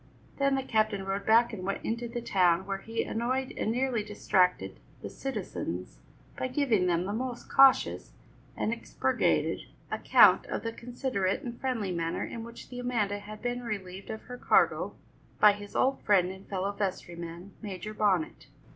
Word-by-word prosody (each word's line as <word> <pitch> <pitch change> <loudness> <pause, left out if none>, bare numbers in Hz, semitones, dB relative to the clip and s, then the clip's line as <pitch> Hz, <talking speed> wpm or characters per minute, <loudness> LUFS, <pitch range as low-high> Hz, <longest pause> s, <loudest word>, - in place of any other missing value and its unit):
Then 275 0 +3
the 270 - -1
captain 215 -5 0
rowed 195 +1 -3
back 230 +2 +5
and 190 -4 -6
went 195 +1 -3
into 235 +1 -2
the 235 0 -5
town, 185 -5 +3
where 195 0 -3
he 225 +3 -3
annoyed 255 +3 -2
and 220 - -1
nearly 245 -2 0
distracted 180 - +1 0.2
the - - -5
citizens 90 +1 -5 0.4
by - - -2
giving 250 -8 +2
them 175 0 +1
the 200 - -3
most 245 +1 -4
cautious 270 -1 +5 0.5
and 220 - 0
expurgated 235 - 0 0.2
account - - +5
of - - -3
the 230 0 -3
considerate 235 -5 -2
and 240 -1 -7
friendly 230 -8 -1
manner 165 -1 -2
in 230 - -6
which 235 0 -10
the 250 - -7
Amanda 220 -5 -1
had 210 +1 -10
been 245 0 -2
relieved 195 -5 -6
of 220 - -6
her 250 0 -9
cargo - - +2 0.4
by 210 - +8
his 205 0 -10
old 265 +1 +2
friend 185 -3 +3
and 190 +1 -12
fellow 195 0 -1
vestryman, 175 -2 -5
Major 205 0 -6
Bonnet. 195 -6 0
215 Hz, 165 wpm, -29 LUFS, 190-240 Hz, 0.5 s, by